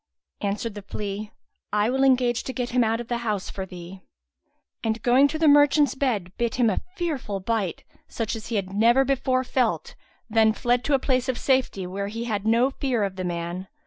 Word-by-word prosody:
Answered 205 +2 -2
the 205 - -7
flea, 205 +1 -5 0.4
"I 210 +3 +2
will 265 +1 +1
engage 250 -3 +3
to 260 - -4
get 245 -1 -3
him 250 0 +3
out 225 0 0
of 240 - -6
the 240 0 -2
house 210 -5 -2
for 190 -1 -5
thee;" 180 +1 -10 0.8
and, 225 0 0
going 255 +4 +5
to 315 - -4
the 320 0 +3
merchant's 290 0 +5
bed, 220 -10 -1
bit 235 -1 0
him 240 -3 +3
a - - -2
fearful 280 - -3
bite, 200 -3 -2 0.2
such 225 0 -3
as 220 0 -8
he 230 - -3
had 195 -2 -2
never 235 +6 +4
before 260 -1 +1
felt, 250 -2 -1 0.3
then 220 -1 +4
fled 245 +1 +1
to 290 - +3
a - - +4
place 260 -1 0
of 255 - 0
safety, 260 -9 +1
where 195 +2 -4
he 225 +3 -4
had 215 -3 -2
no 235 +4 +3
fear 260 -5 -1
of 195 -1 -2
the 185 - -4
man. 175 +1 -4
230 Hz, 210 wpm, -25 LUFS, 200-255 Hz, 0.8 s, going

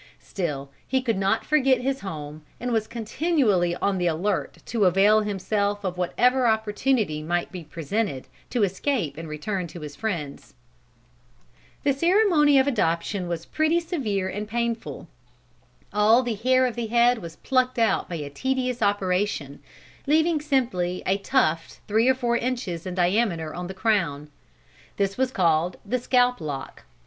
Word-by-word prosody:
Still 145 -8 -4 0.2
he 265 - +1
could 230 -6 0
not 195 +3 +1
forget 270 -4 +3
his 270 +1 -1
home, 155 -5 -7 0.2
and 245 0 -3
was 220 -2 0
continually 225 - +1
on 195 0 0
the 175 - +1
alert 180 +5 -1
to 225 -4 +1
avail 200 +4 +5
himself 205 0 -1
of 185 -2 -2
whatever 245 +8 +2
opportunity 220 - +1
might 175 +3 -2
be 180 -2 -7
presented 160 0 -3 0.2
to 240 -4 +1
escape 195 - -1
and 165 0 -7
return 180 +4 -3
to 170 +1 -10
his 150 -1 -8
friends. 165 -12 -5 1.3
The 280 - +3
ceremony 335 -2 +4
of 265 - +5
adoption 180 -6 0
was 170 -1 -4
pretty 315 +2 +1
severe 240 - -2
and 205 +3 -4
painful. 235 0 -3 0.9
All 220 +4 +5
the 240 -2 -1
hair 255 +4 +3
of 245 - -2
the 235 -2 -3
head 240 +1 +3
was 170 -3 -9
plucked 255 +3 0
out 230 -1 +1
by 175 - -4
a 145 -3 -5
tedious 255 - -2
operation, 185 -7 0 0.5
leaving 315 +1 +3
simply 235 -12 0
a 195 +1 +1
tuft 180 -8 0
three 220 +4 +3
or 260 - +4
four 240 -2 0
inches 230 -9 -3
in 180 - -4
diameter 175 -3 +1
on 180 0 -5
the 190 - -7
crown. 180 -9 0 0.7
This 195 -1 0
was 260 0 +1
called 175 -5 +1
the 250 +5 -1
scalp 250 -1 +2
lock. 145 -3 -6
210 Hz, 155 wpm, -25 LUFS, 175-250 Hz, 1.3 s, avail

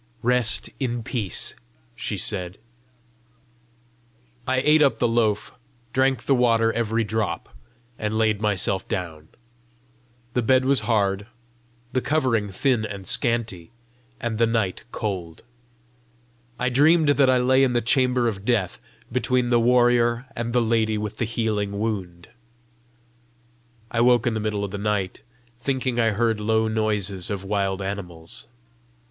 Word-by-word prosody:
"Rest 125 -1 +4
in 120 -3 -2
peace," 110 -6 -2 0.4
she - - -4
said. 90 +1 -3 1.9
I 130 0 +1
ate 155 +1 +5
up 135 -6 +4
the 120 - +2
loaf, 115 +1 0 0.3
drank 130 -2 +1
the 140 - +2
water 115 -3 +3
every 115 0 0
drop, 105 -5 -3 0.4
and 110 0 -2
laid 110 -2 +1
myself 100 -2 0
down. 80 -4 -5 1.1
The 125 - +1
bed 130 +2 +3
was 140 0 +4
hard, 100 -2 +1 0.7
the 130 - +1
covering 125 -9 0
thin 120 +4 0
and 100 -3 -6
scanty, 115 - -1 0.5
and 115 -2 -3
the 115 - +4
night 110 -5 -1
cold: 90 -7 -5 1.1
I 125 0 0
dreamed 150 +4 +4
that 140 -2 +4
I 130 - +4
lay 130 +2 +3
in 130 -2 +2
the 120 - +3
chamber 125 0 +2
of 100 -4 -3
death, 110 -6 0 0.3
between 125 0 0
the 120 - +4
warrior 120 0 +3
and 120 0 -3
the 120 0 +2
lady 110 -1 +1
with 105 0 -5
the 120 - 0
healing 105 -3 -2
wound. 95 -6 -4 1.6
I 115 - +1
woke 120 -1 +4
in 120 - +1
the 110 - -2
middle 105 -1 -2
of 100 - -4
the 100 - -5
night, 100 -3 -2 0.4
thinking 130 -1 -1
I 115 -1 +3
heard 110 +1 0
low 110 +1 +1
noises 105 -4 -1
of 100 -2 -4
wild 100 -1 -1
animals. 90 -4 -6
115 Hz, 140 wpm, -23 LUFS, 100-125 Hz, 1.9 s, ate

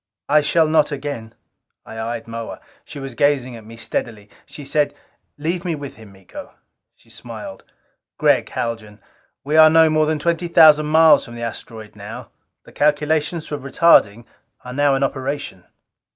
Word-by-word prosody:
"I 150 +1 +4
shall 160 +2 +2
not 155 -1 +2
again." 135 -6 -6 0.5
I 110 - -9
eyed 115 +1 -5
Moa. 115 0 -7 0.2
She 155 - -11
was 135 -2 -7
gazing 130 -1 0
at 115 - -11
me 115 +1 -12
steadily. 110 -3 -5 0.2
She 145 - -11
said, 145 +1 0 0.4
"Leave 170 +4 -3
me 170 -3 -2
with 145 -2 -8
him, 110 -3 -14
Miko...." 95 -1 -12 0.4
She - - -22
smiled. - - -10 0.5
"Gregg - - +2
Haljan, 110 -3 -5 0.4
we 150 +3 0
are 155 0 +8
no 160 0 +5
more 155 0 +2
than 155 0 0
twenty 170 +3 -1
thousand 155 -2 +6
miles 160 -1 +5
from 120 - -11
the 120 - -7
asteroid 110 -2 -8
now. - - -9 0.3
The - - -17
calculations 150 +2 0
for 150 - -5
retarding 130 -6 +3 0.4
are 125 - -7
now 145 0 +2
in 135 - 0
operation." 135 -8 -4
145 Hz, 165 wpm, -20 LUFS, 115-155 Hz, 0.5 s, are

